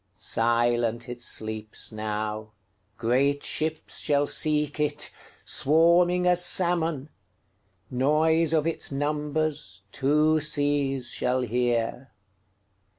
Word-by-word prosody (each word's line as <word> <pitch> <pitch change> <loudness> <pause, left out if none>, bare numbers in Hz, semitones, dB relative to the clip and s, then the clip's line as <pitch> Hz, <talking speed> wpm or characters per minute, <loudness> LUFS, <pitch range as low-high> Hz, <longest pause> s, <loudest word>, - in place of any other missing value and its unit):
Silent 120 0 0
it 120 0 -7
sleeps 110 -2 -2
now; 110 0 -4 0.4
Great 135 +5 +1
ships 155 0 -2
shall 145 -1 +1
seek 150 -1 +1
it, 150 -1 0 0.3
Swarming 170 +4 +3
as 180 0 +3
salmon; 170 -6 +1 0.8
Noise 155 +5 +2
of 155 -2 +2
its 165 - -1
numbersTwo 150 - -1
seas 145 -4 0
shall 125 +1 0
hear. 120 +1 -1
140 Hz, 90 wpm, -26 LUFS, 120-155 Hz, 0.8 s, Swarming